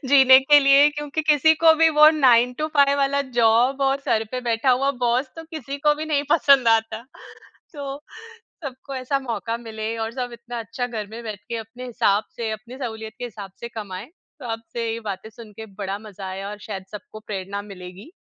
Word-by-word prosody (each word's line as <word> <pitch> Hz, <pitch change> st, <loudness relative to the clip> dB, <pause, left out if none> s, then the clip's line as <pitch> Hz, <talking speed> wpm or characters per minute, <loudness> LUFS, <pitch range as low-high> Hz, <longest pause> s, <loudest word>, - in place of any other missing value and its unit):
जीने 265 Hz, -1 st, +8 dB
के 290 Hz, +2 st, +6 dB
लिए 275 Hz, +1 st, +6 dB
क्योंकि 295 Hz, +1 st, -4 dB
किसी 310 Hz, +1 st, +4 dB
को 325 Hz, -1 st, +8 dB
भी 325 Hz, +1 st, +5 dB
वो 305 Hz, 0 st, +10 dB
9 250 Hz, -5 st, +4 dB
टू 305 Hz, -, 0 dB
5 280 Hz, 0 st, +5 dB
वाला 280 Hz, 0 st, +1 dB, 0.2 s
जॉब 235 Hz, +4 st, +3 dB
और 270 Hz, 0 st, +1 dB
सर 225 Hz, -5 st, 0 dB
पे 255 Hz, -, -2 dB
बैठा 240 Hz, +1 st, +1 dB
हुआ 270 Hz, +3 st, +2 dB
बॉस 245 Hz, +3 st, +1 dB
तो 325 Hz, -, -8 dB
किसी 285 Hz, -4 st, -7 dB
को 295 Hz, +1 st, +3 dB
भी 305 Hz, +1 st, -5 dB
नहीं 290 Hz, -2 st, +1 dB
पसंद 275 Hz, -6 st, +5 dB
आता। 225 Hz, 0 st, +1 dB, 0.7 s
तो 280 Hz, -1 st, -6 dB, 0.7 s
सबको 270 Hz, 0 st, -7 dB
ऐसा 260 Hz, +2 st, -1 dB
मौका 230 Hz, -2 st, -3 dB
मिले 220 Hz, -1 st, -5 dB
और 225 Hz, 0 st, -3 dB
सब 250 Hz, -1 st, -4 dB
इतना 235 Hz, 0 st, -8 dB
अच्छा 230 Hz, +3 st, -4 dB
घर 220 Hz, -4 st, -5 dB
में 225 Hz, +3 st, -9 dB
बैठ 215 Hz, -3 st, -6 dB
के 235 Hz, -, -3 dB
अपने 225 Hz, +3 st, -8 dB
हिसाब 215 Hz, -3 st, +1 dB
से, 230 Hz, -2 st, -3 dB
अपनी 220 Hz, +4 st, -8 dB
सहूलियत 220 Hz, -4 st, -6 dB
के -, -, -5 dB
हिसाब 205 Hz, -5 st, -8 dB
से 235 Hz, -, -6 dB
कमाएँ। 205 Hz, -2 st, -7 dB, 0.3 s
तो 255 Hz, -, -7 dB
आपसे 230 Hz, 0 st, -4 dB
ये 230 Hz, -, -5 dB
बातें 205 Hz, -1 st, -6 dB
सुन 220 Hz, -1 st, -13 dB
के 220 Hz, -, -8 dB
बड़ा 195 Hz, 0 st, -4 dB
मज़ा 205 Hz, -2 st, -10 dB
आया 195 Hz, +1 st, -6 dB
और 210 Hz, -, -8 dB
शायद 195 Hz, -3 st, -6 dB
सबको 215 Hz, +1 st, -10 dB
प्रेरणा 200 Hz, 0 st, -5 dB
मिलेगी 190 Hz, -, -11 dB
235 Hz, 205 wpm, -22 LUFS, 220-275 Hz, 0.7 s, वो